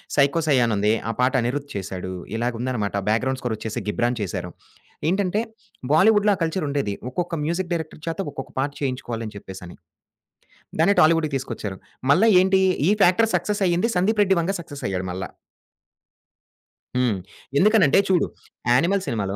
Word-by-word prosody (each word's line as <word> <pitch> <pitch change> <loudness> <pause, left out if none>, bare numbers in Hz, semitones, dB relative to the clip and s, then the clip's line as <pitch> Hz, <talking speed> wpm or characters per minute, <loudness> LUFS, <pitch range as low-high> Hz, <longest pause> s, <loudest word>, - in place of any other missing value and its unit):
'Psycho 140 +3 +3
సై' 140 -3 +4
అనుంది, 105 -2 +1 0.2
ఆ - - +1
పాట 125 +1 +3
'అనిరుద్' 140 +4 -2
చేసాడు 95 -1 -5 0.2
ఇలాగుందనమాట. 120 -2 -2 0.2
బ్యాక్‌గ్రౌండ్‌ 130 +4 0
స్కోరొచ్చేసి 110 -3 -3
'గిబ్రాన్' 120 +3 0
చేశారు. 90 -2 -4 0.6
ఏంటంటే, 195 +2 +1 0.5
బాలీవుడ్‌లో 205 +5 +5
ఆ - - -12
కల్చరుండేది. 145 - -1 0.2
ఒక్కొక్క 175 +3 -3
మ్యూజిక్ 175 +2 -2
డైరెక్టర్ 160 -2 -5
చేత, 165 +4 -3
ఒక్కొక్క 135 - -7
పాట 140 +2 +1
చేయించుకోవాలని 120 -5 -3
చెప్పేసని. 95 -3 -10 1.0
దాన్నే 200 +5 +4
టాలీవుడ్‌కి 155 -2 +3
తీసుకొచ్చారు. 110 -7 -6 0.3
మళ్ళా 220 +9 +5
ఏంటి? 190 0 +3 0.3
ఈ - - +5
ఫ్యాక్టర్ 215 +6 +4
సక్సెస్సయింది, 185 +2 +1
'సందీప్ 205 +4 +2
రెడ్డి 190 -2 +2
వంగా' 195 +3 -1
సక్సెస్ 145 -3 -10
అయ్యాడు 95 -1 -3
మళ్ళా. 95 +1 -5 1.7
హ్మ్. 120 -6 +1 0.4
ఎందుకనంటే 195 -6 +5
చూడు 180 -2 +3 0.4
'యానిమల్' 170 +10 +3
సినిమాలో 100 -5 -2
140 Hz, 135 wpm, -23 LUFS, 115-180 Hz, 1.7 s, బాలీవుడ్‌లో